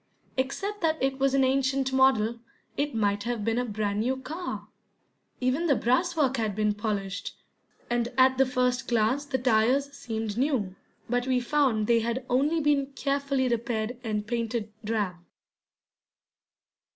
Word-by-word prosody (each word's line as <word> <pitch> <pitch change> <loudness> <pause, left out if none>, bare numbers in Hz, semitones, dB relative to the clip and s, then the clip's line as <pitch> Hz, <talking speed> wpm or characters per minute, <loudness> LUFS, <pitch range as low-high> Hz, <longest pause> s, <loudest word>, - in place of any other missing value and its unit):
Except 390 +11 -2
that 320 -2 +2
it 270 0 0
was 275 0 +2
an 270 - +4
ancient 265 0 +1
model, 235 -4 +3 0.4
it 290 -2 -1
might 205 -2 +1
have 230 -1 -3
been 230 +1 +1
a 250 - 0
brand 210 -2 -2
new 255 +4 0
car. 320 +7 -6 0.7
Even 265 +7 +1
the 285 - +4
brasswork 270 +2 +1
had 215 -4 -1
been 210 0 +1
polished, 205 -2 -3 0.5
and 240 0 0
at 260 0 +5
the 270 - +6
first 250 0 0
glance 240 +5 +1
the 285 -2 -1
tires 255 +3 +2
seemed 225 -4 -4
new, 250 -9 0 0.3
but 245 +1 0
we 255 -1 +2
found 245 -4 +1
they 235 +1 +4
had 235 +3 -2
only 290 +6 +2
been 290 -2 +2
carefully 275 -1 0
repaired 235 -1 -1
and 210 -2 -2
painted 230 -1 -2
drab. 210 -5 -1
250 Hz, 150 wpm, -27 LUFS, 220-270 Hz, 0.7 s, the